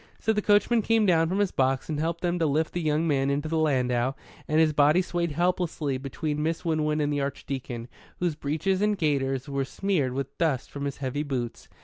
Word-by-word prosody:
So 220 - +1
the 210 - 0
coachman 210 +3 +3
came 225 0 +2
down 165 -3 +3
from 190 - -1
his 205 -2 +1
box 130 0 +1
and 150 -2 -2
helped 165 +2 -1
them 175 0 0
to 165 - +2
lift 155 +2 0
the 175 - -2
young 155 +1 +1
man 140 -3 +1
into 145 +2 -1
the 160 0 0
landau; 130 -4 +1 0.3
and 155 +1 +2
his 160 -1 +4
body 150 +4 +5
swayed 175 -3 -1
helplessly 170 -5 0
between 150 +3 -3
Miss 165 +3 -2
Winwood 155 -2 +1
and 145 0 0
the 145 - 0
Archdeacon, 130 -3 -4 0.3
whose 175 -2 0
breeches 155 +6 -1
and 210 0 +2
gaiters 135 -4 0
were 140 -1 -1
smeared 145 -3 -1
with 135 +1 -4
dust 155 -7 0
from 140 0 -4
his 140 - -3
heavy 130 +3 -1
boots. 130 -5 -4
150 Hz, 215 wpm, -27 LUFS, 140-170 Hz, 0.3 s, body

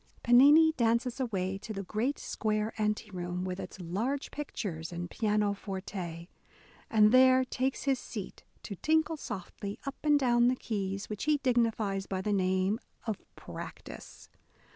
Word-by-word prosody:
Pennini 290 +7 +7
dances 235 +2 +1
away 195 -6 -2
to 220 - -7
the 195 -1 -4
great 225 +9 -1
square 215 0 -2
ante 210 0 -1
room, 180 0 -4
with 185 0 -4
its - - -8
large 220 +11 -2
pictures 185 - -5
and 175 0 -5
pianoforte, 195 -5 -2 0.6
and 215 -1 +5
there 260 +1 +6
takes 260 +1 -2
his 270 -2 +1
seat 205 -6 -7 0.2
to 200 - -6
tinkle 315 - +2
softly 200 - -6
up 275 - -5
and 295 -1 +4
down 240 -2 +4
the 255 - +3
keys, 195 -4 -3
which 210 +4 -4
he 305 -1 +3
dignifies 225 -7 0
by 190 - -2
the 205 +2 -1
name 190 +2 +1 0.3
of 220 -4 -2 0.2
practice." - - -9
215 Hz, 145 wpm, -30 LUFS, 190-255 Hz, 0.6 s, Pennini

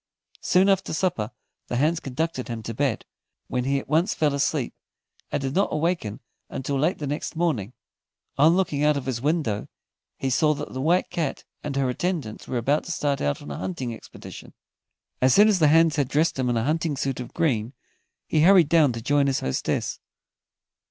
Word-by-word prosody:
Soon 185 +1 +3
after 195 -3 +1
supper, 160 - 0 0.4
the - - -3
hands 155 +6 +2
conducted 140 0 -3
him 115 -2 -5
to 115 - -5
bed, 135 -1 -1 0.4
when 125 -1 -2
he 140 +1 +1
at 135 - -5
once 160 +5 +2
fell 150 -2 +2
fast 140 0 +1
asleep, 140 -6 -2 0.6
and - - 0
did 135 -1 -3
not 195 +4 +1
awaken 155 - -1 0.3
until 135 +1 -3
late 160 +7 +1
the 150 - -5
next 145 +4 -4
morning. 150 - 0 0.6
On 155 +4 +5
looking 155 -6 0
out 150 -1 +3
of 140 - -4
his 125 -3 -2
window, 145 -8 0 0.5
he 135 - -2
saw 155 +3 +3
that 145 +1 -7
the 130 - -3
White 175 +6 +2
Cat 165 -6 -2 0.2
and 145 -2 -4
her 135 -1 +1
attendants 140 - -3
were 125 - -2
about 140 +6 +1
to - - -5
start 145 -3 -1
out 70 0 -1
on 75 - -8
a 70 - -5
hunting 95 +7 -4
expedition. - - -11 0.7
As 130 0 +5
soon 210 +1 +7
as 205 -4 +3
the 155 - +5
hands 160 0 +4
had 140 -3 +1
dressed 155 +1 +1
him 125 -1 +1
in 120 - +1
a 110 - 0
hunting 155 +1 0
suit 135 -2 -2
of 125 - -8
green, 120 -6 0 0.5
he 155 - +1
hurried 175 -2 +6
down 155 -6 +4
to 115 -1 -6
join 145 +1 +2
his 135 - 0
hostess. 65 - -2
145 Hz, 200 wpm, -25 LUFS, 125-165 Hz, 0.7 s, soon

